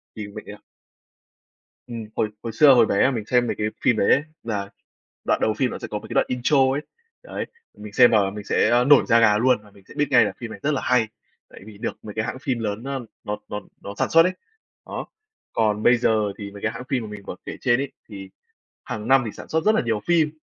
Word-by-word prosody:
thì 105 -2 -6
mấy 105 +1 -9
cái 105 - -9 1.3
Ừm, 115 -2 -6
hồi 110 - 0
hồi 115 -1 -5
xưa, 140 +2 +7
hồi 120 - +6
bé 100 - +1
mà 135 - +3
mình 115 -5 -4
xem 120 +1 +2
mấy - - -2
cái 105 - -1
phim 120 - +3
đấy 100 - +2
ấy, 140 - +4 0.2
là 105 -3 -3 0.6
đoạn - - +1
đầu 110 - +1
phim 125 +2 0
nó - - -6
sẽ - - -7
có 105 - -3
mấy - - -12
cái - - -6
đoạn - - +3
intro 125 +4 +1 0.2
ấy, 140 - -1 0.4
đấy, - - -5 0.3
và - - -15
mình 105 - -8
xem 120 +2 +6
và 100 -3 +3
mình 105 +1 -8
sẽ 120 +4 +3
nổi 145 -1 +6
da 115 0 +5
gà 105 -2 +5
luôn. 125 +1 +3
Và 105 - -18
mình 100 -1 -20
sẽ - - -13
biết 145 - +1
ngay 120 -2 +6
là - - -2
phim 120 -2 -7
này - - -9
rất 150 +1 +1
là 135 - -1
hay, 125 -3 +2 0.4
tại - - -14
vì 105 -2 -12
được - - -4
mấy 105 - -8
cái 110 - -1
hãng 130 - -4
phim 130 -5 -1
lớn 110 0 -3
nó 135 0 -4 0.2
nó 105 0 -3
nó 105 - -4 0.2
nó 100 - -7
sản - - 0
xuất 165 - +7
ấy. 185 +2 +1 0.5
Đó. - - -5 0.5
Còn 105 -1 +1
bây 120 - +5
giờ 110 -4 +1
thì 100 -2 -7
mấy 100 0 -12
cái 110 - 0
hãng 125 - -7
phim 130 -3 0
mà 110 - -7
mình 105 -1 -9
vừa - - -6
kể - - -6
trên 120 +1 +2
ấy, 140 0 -4 0.2
thì 95 -3 -9 0.5
hằng 105 0 -6
năm 135 -1 +5
thì 110 - -4
sản - - -11
xuất 160 0 0
rất 215 +3 +4
là - - +2
nhiều 115 -3 -1
phim, 160 -3 +3
115 Hz, 265 wpm, -23 LUFS, 105-130 Hz, 1.3 s, xưa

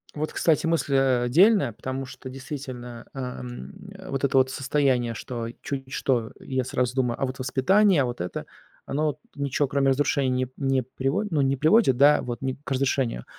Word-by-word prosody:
Вот, 155 +1 -2
кстати, 165 0 +2
мысль, 160 -4 +1
а, 130 -2 +3
а 120 - -1
дельная, 190 - +5
потому 130 +3 -5
что 130 0 -10
действительно, 130 -3 -7
эм, 125 -2 -6 0.4
вот 135 0 -3
это 135 -1 +2
вот 130 0 +4
состояние, 130 -3 +1
что 115 0 -5 0.2
чуть 135 -2 -5
что, 120 -4 0
я 130 -2 -2
сразу 125 0 -1
думаю: 125 -3 0
а - - +1
вот 130 0 -6
воспитание, 175 +6 +3
а - - 0
вот 120 -5 -4
это, 90 - -4 0.4
оно 150 +3 -1
вот 145 - -3
ничего, 140 0 -1
кроме 135 0 +2
разрушения, 135 0 +1
не 130 0 +1
п 125 - -17
не 135 -2 +1
приводит, 135 - -2
ну, 150 - +2
не 135 0 +2
приводит, 155 - +4
да, 145 +2 +6
вот 120 -1 -5
ни 130 -1 -1
к 140 - -8
разрешению 130 - 0
135 Hz, 195 wpm, -25 LUFS, 125-140 Hz, 0.4 s, да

